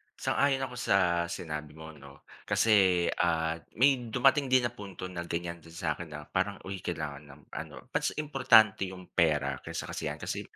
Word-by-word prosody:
sang-ayon 135 -1 +1
ako 125 -2 -5
sa 85 -6 +2
sinabi 75 -4 -6
mo 80 0 -9
'no. 70 -1 -15 0.2
Kasi, 95 -5 +4
ah, 80 -1 0 0.2
may 130 -1 +4
dumating 135 +4 +3
din 130 -1 +4
na 120 - -1
punto 100 -6 -9
na 85 - -4
ganyan 85 0 -3
din 80 - -15
sa 80 -3 -1
'kin 85 - -6
na 75 0 -7
parang, - - 0
uy 95 0 -5
kailangan 70 0 -4
ng 70 +1 -14
ano, - - -7
mas - - 0
importante 130 -10 +4
yung 90 -1 -11
pera 75 -6 +2
kaysa - - -5
kasiyahan. - - -4
Kasi, - - -3
90 Hz, 175 wpm, -30 LUFS, 80-120 Hz, 0.2 s, Kasi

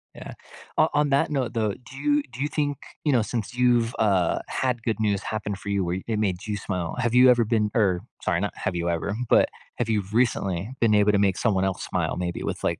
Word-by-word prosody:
Yeah. - - -9 0.4
O - - +5
on 145 0 +2
that 140 +1 +2
note, 135 -5 -1
though, 110 -3 0
do 130 +4 -13
you 145 0 +1
do 125 - -8
you 145 - +1
think, 145 -2 -1 0.3
you 150 - +2
know, 120 -3 +4
since 110 +2 -3
you've, 120 -2 +2
uh, 95 -5 +2
had 125 -3 -1
good 110 -3 -1
news 100 -2 +1
happen 105 -2 -3
for 100 - -12
you 100 -2 +1
where 90 +2 -2
it 110 - -1
made 95 -1 -1
you 105 - -1
smile, 90 -5 -3
have 120 -2 0
you 125 +1 +7
ever 120 -2 +5
been 110 -1 +1
er, 95 -6 +2 0.2
sorry, - - +1
not - - -2
have 90 - -3
you 85 0 -1
ever, 85 +4 -2
but - - +5 0.3
have 120 -2 -2
you 105 -3 +1
recently 105 -4 0
been 110 -2 +4
able 105 0 +4
to 100 - +2
make 100 -2 +2
someone 95 -5 +1
else 95 -2 -2
smile - - -1
maybe 90 -1 -3
with, - - -4
like, - - 0
110 Hz, 240 wpm, -25 LUFS, 100-125 Hz, 0.4 s, you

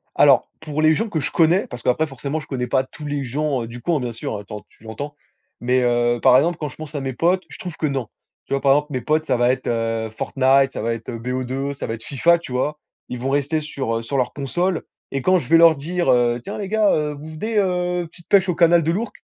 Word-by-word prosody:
Alors, - - +5
pour 155 0 -3
les 155 0 +5
gens 225 +7 -1
que 160 -6 -2
je - - -2
connais, 170 +4 +3
parce 120 -1 -9
qu'après 125 +7 +1
forcément 140 +2 -4
je 155 - -9
connais 125 -3 -3
pas 130 +2 +1
tous 150 +3 -10
les 145 -1 -2
gens, 140 +1 -1
heu, - - -5
du 120 +1 -9
coin, 165 +3 0
bien 125 -3 -3
sûr, 110 -1 -5
heu, - - -12
tu - - -12
en 105 - -5
tu - - -24
l'entends? 140 +7 -6 0.5
Mais 125 +2 +2
heu, 120 -1 +2
par 125 - +7
exemple, 160 +5 +2
quand 150 - -3
je 130 - -13
pense 155 -1 -9
à 145 - -2
mes 135 -1 -4
potes, 180 +6 +1
je - - -10
trouve 175 -3 -7
que 155 - -1
non. 135 -6 -2 0.4
Tu - - -10
vois, 140 - +1
par 135 0 +4
exemple, 150 +1 +2
mes 130 - -1
potes 155 +5 0
ça 140 - +1
va 120 +1 +3
être, 130 0 -1
heu, 115 -1 -1
Fortnite, 135 +4 +2
ça - - -4
va 115 +1 0
être, 115 -1 -7
heu, 115 - -4
BO2, 130 +3 -3
ça 140 - -5
va 115 - -3
être 115 - -9
FIFA, 170 +5 +3
tu 135 - -9
vois? 150 +4 -1 0.3
Ils 125 - -5
vont 130 +3 -2
rester 145 +3 0
sur, 135 -6 -3
heu, 115 - -3
sur 140 +5 -3
leur 125 - 0
console 175 +6 -1 0.3
et 135 - 0
quand 185 +4 +4
je - - -5
vais 165 - +6
leur 165 -1 +7
dire: 170 +3 -2
«Heu, 120 -1 +2
tiens - - -6
les 200 -2 -4
gars, 215 0 +3
heu, 150 -1 0
vous 150 +2 -9
venez, 215 +8 -2
heu, 180 -2 0
petite 170 0 -16
pêche 195 -2 +4
au 180 - +1
canal 170 0 +5
de 160 - 0
l'Ourcq?» 210 +6 -2
140 Hz, 280 wpm, -21 LUFS, 125-165 Hz, 0.5 s, par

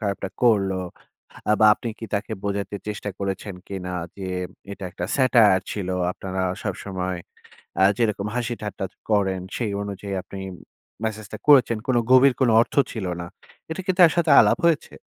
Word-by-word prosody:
খারাপটা 100 -2 -2
করলো? 100 -5 +3 0.8
আ - - +6
বা 110 - +7
আপনি 120 - -6
কি - - -6
তাকে 100 0 -2
বোঝাতে 100 0 -2
চেষ্টা 105 0 -4
করেছেন 100 0 -4
কিনা 95 -2 -5 0.3
যে, 100 - -8 0.5
এটা 100 - -8
একটা 90 - -5
satire 115 -8 +5
ছিল। 100 -3 -4 0.2
আপনারা 95 0 -4 0.2
সবসময় 95 -2 -3 0.7
আ - - +6
যেরকম 105 -3 0
হাসি 120 -1 -1
ঠাট্টা 100 -2 -4
চ - - -35 0.2
করেন 95 -3 +1
সেই 115 -4 -2
অনুযায়ী 100 0 -5
আপনি 95 - -9 0.6
মেসেজটা 110 -2 -4
করেছেন, 130 -6 +6
কোন 130 - +2 0.2
গভীর 130 +1 +7
কোন 130 -3 +3
অর্থ - - -3 0.2
ছিল 110 -5 -4 0.2
না। - - -5 0.4
এটা 160 +4 -4
কি 190 - +2
তার 170 -3 +8
সাথে 170 -3 +2
আলাপ - - +5
হয়েছে? 165 -3 +1
105 Hz, 165 wpm, -23 LUFS, 95-120 Hz, 0.8 s, তার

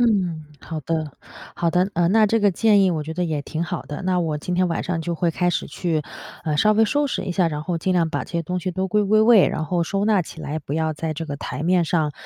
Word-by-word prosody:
嗯， 185 -9 +1 0.2
好 160 -1 -6
的， 155 -1 -3 0.4
好 170 -1 +1
的。 180 +3 +1
嗯， 175 +2 +2
那 220 -1 +5
这 225 +2 +2
个 205 -2 +3
建 205 +1 +4
议 185 - +3
我 160 -3 -1
觉 160 +2 -6
得 180 +1 -1
也 155 -3 -2
挺 160 +3 -3
好 175 0 -4
的。 145 - -7
那 185 -1 +1
我 155 -3 -1
今 180 +4 -3
天 180 0 +2
晚 165 - -2
上 170 -2 -2
就 170 +1 -2
会 175 - +1
开 175 +1 +1
始 165 - -2
去， 160 +1 -2 0.4
呃， 150 -2 0
稍 215 +7 +4
微 220 +1 +4
收 290 +5 +1
拾 - - -2
一 180 - -3
下， 175 -2 +2
然 150 -1 -5
后 175 -1 -1
尽 185 +3 0
量 170 -2 +2
把 - - -2
这 - - -11
些 170 -1 -1
东 180 +3 -3
西 185 - -2
都 190 +2 -2
归 210 +3 +2
归 215 +2 +4
位， 220 -3 +6
然 155 - -3
后 175 +2 0
收 195 +4 -1
纳 210 -4 +3
起 160 - -11
来， 155 +1 -4
不 140 - -7
要 160 0 0
在 155 +1 -3
这 165 +2 -5
个 145 -2 -4
台 150 - -5
面 180 0 +3
上， 155 -3 0
175 Hz, 310 characters per minute, -22 LUFS, 160-190 Hz, 0.4 s, 位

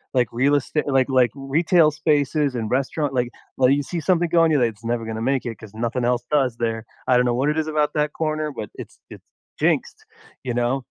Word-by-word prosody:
Like, 125 -2 +3
real 135 +5 +2
estate 145 +2 -1
like 135 -1 +2
like, 130 -2 +3
retail 155 +4 +3
spaces 150 -2 +1
and 110 -3 -3
restaurant. 135 +2 -1
Like 125 -2 0 0.3
like, 130 0 +4
you 145 0 0
see 170 +5 -4
something 175 +1 +1
going, 165 -1 +4
you're 150 - +3
like, 120 -2 +2
"It's 105 +1 -22
never 115 0 -1
gonna 110 0 -4
make 130 +2 0
it 115 -2 -4
'cause 110 -2 -13
nothing 120 +2 -2
else 120 0 +1
does 130 -5 +1
there. 115 -1 -2 0.2
I 125 - +4
don't 125 - +3
know 120 - +1
what 135 +4 +1
it 150 - -1
is 155 - -2
about 150 -1 0
that 150 0 0
corner, 155 -1 -2
but 110 -7 -7
it's - - -10
it's - - -11 0.4
jinxed," - - 0 0.4
you 125 -2 -3
know? 120 +2 0
135 Hz, 230 wpm, -22 LUFS, 120-150 Hz, 0.4 s, like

